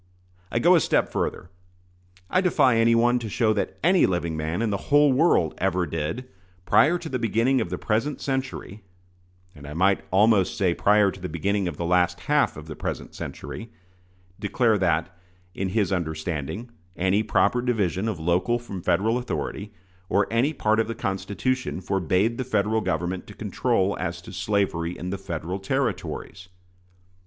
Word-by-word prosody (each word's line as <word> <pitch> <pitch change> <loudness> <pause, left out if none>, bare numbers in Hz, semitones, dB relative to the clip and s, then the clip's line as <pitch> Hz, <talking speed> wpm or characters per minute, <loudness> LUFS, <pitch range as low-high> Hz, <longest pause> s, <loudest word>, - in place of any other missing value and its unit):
I - - -1
go - - +5
a - - +6
step - - +1
further. 90 - -3 0.8
I 185 - +2
defy 145 -10 +3
anyone 115 +2 +4
to 115 -2 -5
show 110 +1 +2
that - - -2
any 180 +2 +5
living 85 -3 -1
man 80 +7 -2
in 110 - 0
the 100 - -4
whole 145 -1 +5
world 130 - +3
ever 90 -1 +1
did, 80 +11 -4 0.4
prior 165 - +4
to 175 - -8
the 130 -4 -2
beginning 115 +4 +2
of - - -3
the 90 - -3
present 115 +9 -1
century 130 -6 -4 0.7
(and 70 -2 -12
I 75 - -7
might 95 +3 +3
almost 100 0 +3
say 95 -5 +2
prior 105 +1 +3
to 95 - -12
the 90 0 -5
beginning 100 +3 -1
of 80 -4 -5
the 85 - -3
last 90 0 +2
half 150 - +1
of 75 - -9
the 80 -1 -8
present - - -5
century), 115 - -7 0.7
declare 110 0 +1
that, 85 -1 0 0.4
in 95 +1 -2
his 100 -1 0
understanding, 85 - -3 0.2
any 95 +3 +2
proper 120 +2 +2
division 105 -5 0
of 105 -7 -3
local 90 +9 +1
from 110 -6 -7
Federal 110 +9 +1
authority, 105 -4 -4 0.4
or 100 +2 +3
any 120 +6 +2
part 110 -7 +1
of 115 - +1
the 115 - -4
Constitution, 105 +4 -2
forbade 95 +5 0
the - - 0
Federal 110 -2 0
Government 90 +1 -2
to - - -11
control 95 +1 0
as 85 -1 -3
to 90 - -10
slavery 90 -2 -1
in 90 +1 -5
the 100 - -4
Federal 90 0 -4
Territories. 95 - -3
100 Hz, 170 wpm, -25 LUFS, 90-115 Hz, 0.8 s, a